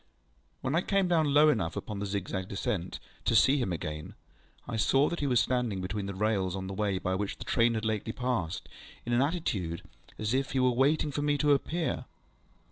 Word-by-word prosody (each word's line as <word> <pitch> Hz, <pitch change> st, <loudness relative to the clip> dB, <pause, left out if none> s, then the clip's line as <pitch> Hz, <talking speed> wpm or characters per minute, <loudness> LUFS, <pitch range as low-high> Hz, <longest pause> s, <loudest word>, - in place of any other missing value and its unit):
When 130 Hz, -, -1 dB
I 170 Hz, -, +3 dB
came 195 Hz, -1 st, +1 dB
down 160 Hz, -4 st, +2 dB
low 150 Hz, +2 st, +6 dB
enough 95 Hz, -, 0 dB
upon 105 Hz, -2 st, -5 dB
the 100 Hz, -, -2 dB
zigzag 95 Hz, -1 st, -3 dB
descent 95 Hz, -2 st, -3 dB, 0.3 s
to -, -, +2 dB
see 140 Hz, +2 st, +5 dB
him 120 Hz, -8 st, -1 dB
again, 75 Hz, -2 st, -5 dB, 0.5 s
I -, -, -3 dB
saw 135 Hz, +6 st, +3 dB
that 170 Hz, -, -3 dB
he 145 Hz, -, 0 dB
was 125 Hz, -3 st, +3 dB
standing 125 Hz, -6 st, 0 dB
between 100 Hz, +2 st, -3 dB
the 100 Hz, -, -5 dB
rails 95 Hz, -3 st, 0 dB
on 95 Hz, -1 st, -4 dB
the 95 Hz, -, -5 dB
way 100 Hz, -1 st, 0 dB
by 95 Hz, 0 st, -1 dB
which 100 Hz, +1 st, -2 dB
the -, -, -7 dB
train 115 Hz, 0 st, +3 dB
had 110 Hz, 0 st, -2 dB
lately 110 Hz, 0 st, -1 dB
passed, 115 Hz, -9 st, -2 dB, 0.4 s
in 120 Hz, -, -1 dB
an 120 Hz, -, +4 dB
attitude 110 Hz, -, -1 dB, 0.3 s
as 110 Hz, +2 st, -1 dB
if 135 Hz, +1 st, 0 dB
he 135 Hz, -, +1 dB
were 130 Hz, 0 st, +4 dB
waiting 140 Hz, +4 st, +2 dB
for 145 Hz, -, -2 dB
me 145 Hz, 0 st, +2 dB
to 145 Hz, +1 st, +3 dB
appear. 160 Hz, +4 st, -1 dB
115 Hz, 210 wpm, -30 LUFS, 95-140 Hz, 0.5 s, low